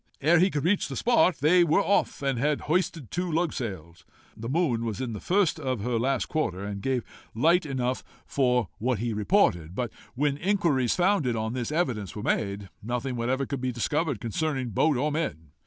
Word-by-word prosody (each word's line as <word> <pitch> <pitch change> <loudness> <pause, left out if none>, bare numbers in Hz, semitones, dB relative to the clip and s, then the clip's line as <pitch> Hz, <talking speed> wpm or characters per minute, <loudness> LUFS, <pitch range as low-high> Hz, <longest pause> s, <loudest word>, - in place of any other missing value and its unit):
Ere 160 +4 +4
he 185 +3 +4
could 145 -5 -2
reach 190 +3 +2
the - - -6
spot, 235 -7 +3
they 175 +4 +5
were 165 +2 +3
off, 200 -7 +1
and 135 -3 0
had 150 +3 +1
hoisted 165 - -1
two 180 0 -2
lugsails. 100 - -3 0.3
The 115 +2 -6
moon 135 -7 +1
was 115 -2 -3
in 125 -3 -3
the 105 - -5
first 185 -3 +1
of 130 -7 -2
her 120 +1 0
last 130 +2 +1
quarter, 110 - -2
and 100 -1 -5
gave 130 -1 0 0.3
light 165 +7 +3
enough 130 -2 -1 0.2
for 125 - +1
what 125 +1 0
he 115 +2 -2
reported. 100 - +2
But, 120 0 -2 0.2
when 140 +1 +1
inquiries 165 - +1
founded 175 - +2
on 110 +1 -2
this 125 +1 -3
evidence 125 - -1
were 105 - -5
made, 100 -2 -1
nothing 125 +3 -3
whatever 130 +3 0
could 135 -1 -4
be 130 -1 -1
discovered 145 +2 -1
concerning 130 +2 -2
boat 145 +7 +2
or 150 +4 0
men. 80 - -3
130 Hz, 190 wpm, -27 LUFS, 115-160 Hz, 0.3 s, they